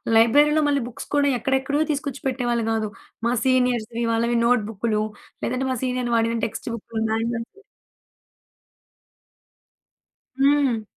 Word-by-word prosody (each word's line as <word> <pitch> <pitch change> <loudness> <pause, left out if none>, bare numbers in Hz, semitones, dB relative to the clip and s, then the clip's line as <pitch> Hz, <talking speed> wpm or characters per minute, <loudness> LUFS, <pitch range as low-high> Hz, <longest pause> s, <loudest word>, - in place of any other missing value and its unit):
లైబ్రరీలో 290 +7 +5
మళ్ళీ 280 -2 +2
బుక్స్ 245 - -9
కూడా 285 -1 +3
ఎక్కడెక్కడవో 270 +4 0
తీసుకొచ్చి 280 -1 -3
పెట్టేవాళ్ళు 240 -3 0
గాదు. 220 -1 -1 0.4
మా 240 - +2
సీనియర్స్‌వి 245 -3 +1
వాళ్ళవి 235 +1 +1
నోట్ 240 -2 +3
బుక్కులు 215 0 -1 0.4
లేదంటే 255 +2 -1
మా 255 - -1
సీనియర్లు 250 -1 -1
వాడిన 230 +1 +1
టెక్స్ట్ 230 - -5
బుక్కులు, 225 0 -4
మ్యాన్యువల్స్ 230 +1 -2 2.9
హ్మ్. 275 -5 +3
240 Hz, 115 wpm, -23 LUFS, 230-265 Hz, 2.9 s, లైబ్రరీలో